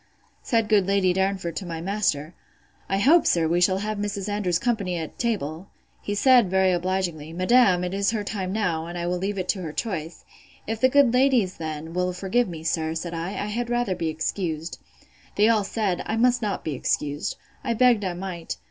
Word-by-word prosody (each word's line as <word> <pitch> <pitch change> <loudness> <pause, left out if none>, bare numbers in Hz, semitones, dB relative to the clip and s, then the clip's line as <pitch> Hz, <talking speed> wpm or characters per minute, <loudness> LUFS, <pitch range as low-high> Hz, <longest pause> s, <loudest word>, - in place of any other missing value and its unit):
Said 230 -3 +1
good 205 -3 +3
Lady 195 -2 +2
Darnford, 190 -3 -1
to - - -3
my 165 -1 -4
master, 170 -4 -1 0.6
I 195 - +1
hope, 300 - +5
sir, 165 -2 +3
we 170 +2 +1
shall 185 +1 +3
have 210 +1 -3
Mrs. 205 -1 -3
Andrews's 205 -4 0
company 200 -5 -1
at 160 -2 -6
table. 190 -7 -2 0.3
He 205 - -3
said, 245 -2 +5
very 190 0 +3
obligingly, 175 -3 -2
Madam, 185 0 +4
it 180 +1 -3
is 200 0 +1
her 220 -2 -1
time 195 -3 -3
now; 175 -6 -1
and 175 +1 -6
I 170 - -3
will 180 +1 -1
leave 200 +2 -2
it 185 -1 -3
to 190 - 0
her 160 -3 -5
choice. 165 -4 -4 0.4
If 225 +1 -4
the 260 - +5
good 275 -3 +4
ladies, 250 -7 +3
then, 160 0 -5
will 180 0 0
forgive 195 +5 0
me, 160 -2 -7
sir, 160 -1 -1
said 170 +1 -4
I, 165 +2 -3
I 205 - -3
had 235 +3 -3
rather 240 -5 0
be 165 -3 -2
excused. 160 0 -3 0.6
They 210 +1 +4
all 220 -2 +3
said, 200 -3 -1
I 220 - -1
must 245 +1 +3
not 205 -3 -2
be 155 - -3
excused. 145 +2 -2 0.3
I 235 -3 -1
begged 240 -3 +4
I 185 -2 -1
might. 175 -2 -5
190 Hz, 205 wpm, -24 LUFS, 170-215 Hz, 0.6 s, hope